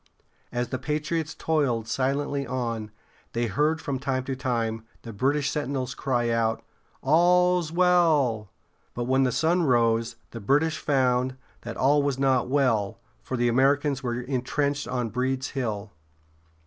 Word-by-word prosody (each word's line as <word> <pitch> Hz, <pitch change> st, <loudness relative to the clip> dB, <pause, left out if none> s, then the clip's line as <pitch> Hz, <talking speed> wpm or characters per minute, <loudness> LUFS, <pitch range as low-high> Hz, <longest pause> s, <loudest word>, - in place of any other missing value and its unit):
As 120 Hz, 0 st, -2 dB
the 130 Hz, -, -3 dB
patriots 155 Hz, +2 st, -2 dB
toiled 135 Hz, -8 st, 0 dB
silently 140 Hz, +2 st, -1 dB
on, 115 Hz, -4 st, -3 dB, 0.4 s
they 120 Hz, +1 st, 0 dB
heard 150 Hz, +8 st, +1 dB
from 140 Hz, -3 st, -3 dB
time 130 Hz, -1 st, -1 dB
to 130 Hz, +1 st, -3 dB
time 115 Hz, -4 st, -2 dB, 0.2 s
the 115 Hz, -, -8 dB
British 140 Hz, +6 st, +1 dB
sentinels 135 Hz, -3 st, -2 dB
cry 120 Hz, -3 st, 0 dB
out, 115 Hz, -1 st, 0 dB, 0.4 s
"All's 175 Hz, +2 st, +3 dB
well!" 160 Hz, -, +3 dB, 0.5 s
But 120 Hz, -, -2 dB
when 130 Hz, +2 st, +2 dB
the 125 Hz, -, +1 dB
sun 160 Hz, +8 st, +2 dB
rose, 115 Hz, -5 st, +2 dB, 0.2 s
the 115 Hz, -, -7 dB
British 150 Hz, +9 st, +2 dB
found 130 Hz, -2 st, +1 dB, 0.2 s
that 115 Hz, -1 st, -7 dB
all 145 Hz, +2 st, +4 dB
was 140 Hz, -2 st, 0 dB
not 135 Hz, -2 st, +2 dB
well, 115 Hz, -8 st, +1 dB, 0.2 s
for 130 Hz, -, -4 dB
the 120 Hz, 0 st, +2 dB
Americans 135 Hz, +3 st, +2 dB
were 120 Hz, -2 st, -2 dB
intrenched 140 Hz, +3 st, -1 dB
on 125 Hz, -2 st, -2 dB
Breeds 130 Hz, +2 st, -1 dB
Hill. 110 Hz, -6 st, -3 dB
130 Hz, 145 wpm, -26 LUFS, 120-145 Hz, 0.5 s, all